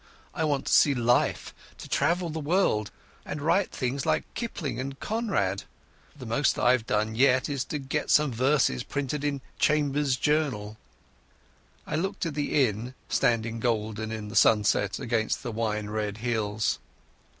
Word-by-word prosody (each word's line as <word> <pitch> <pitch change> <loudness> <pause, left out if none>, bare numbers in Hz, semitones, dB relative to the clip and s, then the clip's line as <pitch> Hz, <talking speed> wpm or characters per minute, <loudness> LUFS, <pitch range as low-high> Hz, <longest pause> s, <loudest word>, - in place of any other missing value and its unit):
I 160 - -1
want 145 -3 0
to - - 0
see 145 -2 +5
life, 120 0 +1 0.2
to - - -9
travel 170 0 +1
the 160 - -4
world, 145 - +1 0.3
and 150 - -5
write 170 +6 +2
things 130 +1 -2
like - - +1
Kipling 150 - -4
and 135 +1 -5
Conrad. 190 - -1 0.5
But 145 - -22
the - - -6
most 120 +5 +1
I've 125 -2 +3
done 110 +1 0
yet 130 +2 +3
is 140 -3 -2
to 150 - -3
get 140 +2 -3
some 150 -2 +4
verses 125 - +2
printed 140 +1 -3
in 140 -2 -1 0.2
Chambers's 145 -3 +2
Journal." 130 -10 0 1.1
I - - -2
looked 190 +3 -2
at 165 - -2
the 145 -1 +2
inn 115 +3 -4
standing 115 -1 +1
golden 110 -1 -1
in 110 -1 -5
the 105 - -8
sunset 105 -2 +3
against 115 -2 -1
the 120 -3 -4
brown 105 -1 -2
hills. 110 -2 -1
125 Hz, 155 wpm, -27 LUFS, 110-150 Hz, 1.1 s, see